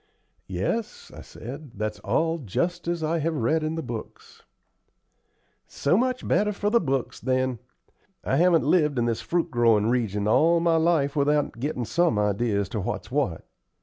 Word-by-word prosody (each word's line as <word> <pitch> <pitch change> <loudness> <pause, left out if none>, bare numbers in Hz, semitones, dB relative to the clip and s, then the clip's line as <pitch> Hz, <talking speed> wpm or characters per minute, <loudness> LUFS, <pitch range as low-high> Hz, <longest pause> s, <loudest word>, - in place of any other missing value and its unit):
"Yes," 225 -1 -3
I - - -9
said, 135 +3 -10
"that's 105 +1 -3
all 165 +1 0
just 170 - -2
as 170 -1 -1
I 165 +2 0
have 160 +1 -1
read 155 +5 +1
in 155 +1 -2
the 165 - -3
books." 115 -3 -8 1.3
"So 145 +5 0
much 255 +3 +1
the - - -10
better 210 +1 +2
for 205 +1 -1
the 235 - +5
books, 135 -4 -2
then. 130 -2 0 0.6
I 135 - 0
haven't 170 -1 +4
lived 150 -3 +2
in 120 - +1
this 115 -1 -1
fruit 170 -1 -1
growin' 115 -3 +3
region 105 -4 0
all 165 +9 +4
my 165 -1 +2
life 160 -4 +2
without 145 -3 +1
gettin' 125 -2 -2
some 165 +2 +1
ideas 105 +1 +1
as 100 - -5
to 110 - -3
what's 95 - -4
what. - - -1
145 Hz, 175 wpm, -25 LUFS, 120-170 Hz, 1.3 s, the